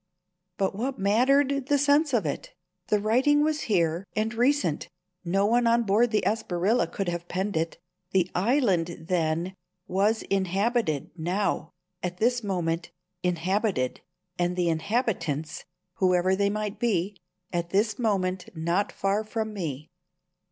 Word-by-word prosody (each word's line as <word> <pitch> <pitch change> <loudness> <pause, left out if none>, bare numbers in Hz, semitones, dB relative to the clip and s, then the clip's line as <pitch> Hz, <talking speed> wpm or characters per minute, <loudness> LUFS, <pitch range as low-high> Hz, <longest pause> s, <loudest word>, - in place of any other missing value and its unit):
But 195 -1 0
what 250 +7 -3
mattered 265 +7 +3
the 290 - +3
sense 285 +2 +3
of 235 -5 +1
it? - - -4 0.3
The 210 - +2
writing 260 +8 +3
was 310 0 0
here, 170 -3 +2
and 220 +1 0
recent. 245 - +1 0.3
No 195 +3 +1
one 235 +2 +3
on 235 0 +4
board 220 +3 +3
the 215 -1 +1
Espriella 195 -2 +1
could 195 - -3
have 175 0 -3
penned 190 +3 -2
it. 165 +1 -1 0.3
The 185 -2 +2
island, 190 - +1
then, 170 +1 0 0.3
was 205 +4 +1
inhabited 195 - 0
now, 175 -1 -1 0.3
at 180 0 -3
this 240 +3 +1
moment 170 -4 -1 0.3
inhabited, 180 - 0 0.4
and 175 0 +1
the 175 -1 +1
inhabitants, 165 - -1 0.3
whoever 185 -2 +3
they 200 +1 +2
might 210 0 -3
be, 205 -4 0 0.4
at 170 -1 -1
this 210 +6 +1
moment 190 -5 0
not 170 +5 0
far 195 +2 0
from 220 0 -3
me. 155 -7 -5
195 Hz, 135 wpm, -27 LUFS, 175-230 Hz, 0.4 s, on